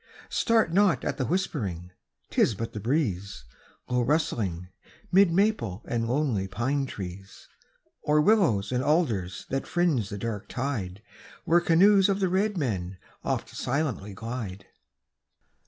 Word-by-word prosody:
Start 225 -7 +2
not 200 -2 +3
at - - -2
the 130 - -1
whispering, 100 - -2 0.4
'tis 110 - +3
but 115 +3 -5
the 105 - -4
breeze, 100 - -1 0.4
Low 125 0 +1
rustling, 110 - -1 0.4
'mid 190 -1 +5
maple 165 - +1
and 115 -1 -1
lonely 125 -8 0
pine 130 +8 -1
trees, 95 -2 -8 0.5
Or 150 0 +2
willows 155 - +3
and 125 0 0
alders 115 - 0
that 135 0 -2
fringe 160 - +1
the 100 - -5
dark 105 -1 -4
tide 110 -8 -3 0.4
Where 170 +1 +4
canoes 195 +4 +5
of 195 0 +1
the 190 -2 +1
red 200 +2 +1
men 95 - -2 0.3
oft - - -2
silently 125 -8 -2
glide. 115 -3 -6
125 Hz, 135 wpm, -27 LUFS, 100-165 Hz, 0.5 s, mid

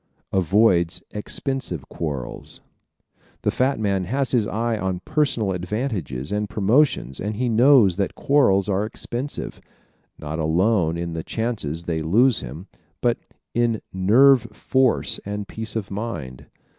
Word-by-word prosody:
Avoids 95 -2 +3
Expensive 105 - -4
Quarrels 70 -7 -5 0.6
¶ - - -38 0.2
The - - +2
fat 130 0 +1
man 100 -3 0
has 135 +6 -1
his 115 -5 +2
eye 115 +1 -1
on 95 -3 -2
personal 145 -10 0
advantages 90 - -3
and 105 0 -1
promotions 110 - +2
and 105 +2 -3
he 125 +4 -1
knows 115 -5 +5
that 100 -2 -1
quarrels 100 -10 +3
are 100 0 +1
expensive, 120 +5 -5 0.6
not 75 +2 -5
alone 85 +1 +2
in 85 0 -4
the 80 -1 -4
chances 105 -9 -3
they 85 -2 -2
lose 110 +9 +3
him, 70 +9 -8 0.3
but - - +1 0.3
in 120 -2 +1
nerve 115 +7 +5
force 130 +3 +1
and 105 0 -5
peace 110 0 -3
of 105 -4 -3
mind. 85 - -5
105 Hz, 135 wpm, -23 LUFS, 85-120 Hz, 0.6 s, knows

